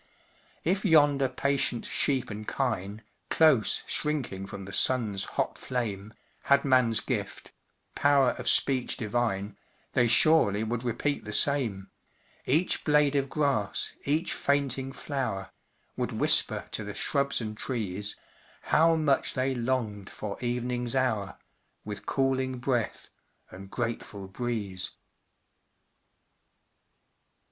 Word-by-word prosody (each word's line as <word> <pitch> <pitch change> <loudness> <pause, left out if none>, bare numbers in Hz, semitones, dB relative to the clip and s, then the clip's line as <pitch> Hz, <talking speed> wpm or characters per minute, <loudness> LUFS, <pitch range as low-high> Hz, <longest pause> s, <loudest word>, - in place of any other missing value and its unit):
If 190 +4 0
yonder 145 -7 +4
patient 130 -2 0
sheep 130 -5 0
and 105 +1 -7
kine, 110 -5 -3 0.3
Close 155 -9 +4
shrinking 130 -11 -2
from 95 0 -8
the 100 - -9
sun's 110 -7 +3
hot - - -3
flame, 110 -4 -4 0.3
Had 140 0 +3
man's 125 -4 +3
gift - - -4 0.4
"power 140 -3 +3
of - - +1
speech 130 -3 +3
divine," 105 -3 -2 0.4
They 120 - +3
surely 115 -4 +5
would 115 +2 -3
repeat 125 +4 -2
the 105 - -7
same 110 -8 +2 0.6
Each 160 +7 +2
blade 150 -1 +3
of 140 -1 0
grass, 140 -10 0
each 155 +5 0
fainting 135 -2 -1
flower, 125 -9 -4 0.4
Would - - -3
whisper - - +4
to - - -3
the - - -7
shrubs 140 0 +1
and 110 -2 -5
trees, 105 -5 -4 0.5
How 165 +1 +3
much 150 -4 +1
they 130 0 0
longed 115 -5 -2
for 105 -2 -6
evening's 125 0 -2
hour, 110 -7 -1 0.5
With 105 -1 -7
cooling 130 -1 0
breath 120 -2 -2 0.4
and 95 +1 -11
grateful 115 -4 -5
breeze. 100 -3 -4
125 Hz, 115 wpm, -28 LUFS, 105-140 Hz, 0.6 s, surely